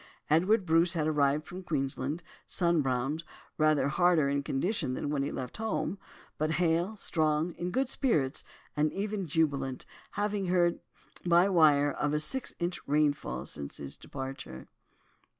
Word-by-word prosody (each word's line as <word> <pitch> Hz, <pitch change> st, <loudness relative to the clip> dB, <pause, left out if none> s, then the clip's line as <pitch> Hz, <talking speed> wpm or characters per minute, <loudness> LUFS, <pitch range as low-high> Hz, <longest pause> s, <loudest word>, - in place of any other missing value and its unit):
Edward 185 Hz, +6 st, +4 dB
Bruce 165 Hz, +2 st, +3 dB
had 160 Hz, -3 st, 0 dB
arrived 150 Hz, -1 st, +2 dB
from 185 Hz, +1 st, -8 dB
Queensland, 145 Hz, -1 st, -2 dB, 0.2 s
sunbrowned, 150 Hz, -3 st, +1 dB, 0.4 s
rather 155 Hz, -2 st, +4 dB
harder 165 Hz, -1 st, +3 dB
in 140 Hz, 0 st, +1 dB
condition 140 Hz, -, -1 dB
than 145 Hz, -, -3 dB
when 145 Hz, -2 st, 0 dB
he 140 Hz, -, -2 dB
left 125 Hz, -2 st, -5 dB
home, 220 Hz, -2 st, -2 dB, 0.4 s
but 155 Hz, +1 st, +1 dB
hale, 175 Hz, +4 st, +1 dB
strong, 155 Hz, -1 st, +1 dB
in 175 Hz, +2 st, -4 dB
good 265 Hz, +7 st, 0 dB
spirits, 190 Hz, -, +1 dB, 0.3 s
and 150 Hz, +1 st, +2 dB
even 200 Hz, -2 st, -2 dB
jubilant, 140 Hz, -4 st, 0 dB, 0.3 s
having 205 Hz, -1 st, -1 dB
heard 175 Hz, -1 st, +2 dB, 0.4 s
by 175 Hz, +1 st, +5 dB
wire 150 Hz, -6 st, +5 dB
of 145 Hz, +1 st, -1 dB
a -, -, +2 dB
six 240 Hz, +13 st, -3 dB
inch 175 Hz, +1 st, -2 dB
rainfall 145 Hz, -, +1 dB
since 70 Hz, -1 st, -7 dB
his 70 Hz, -1 st, -5 dB
departure. 135 Hz, -, -7 dB
155 Hz, 145 wpm, -30 LUFS, 140-180 Hz, 0.4 s, by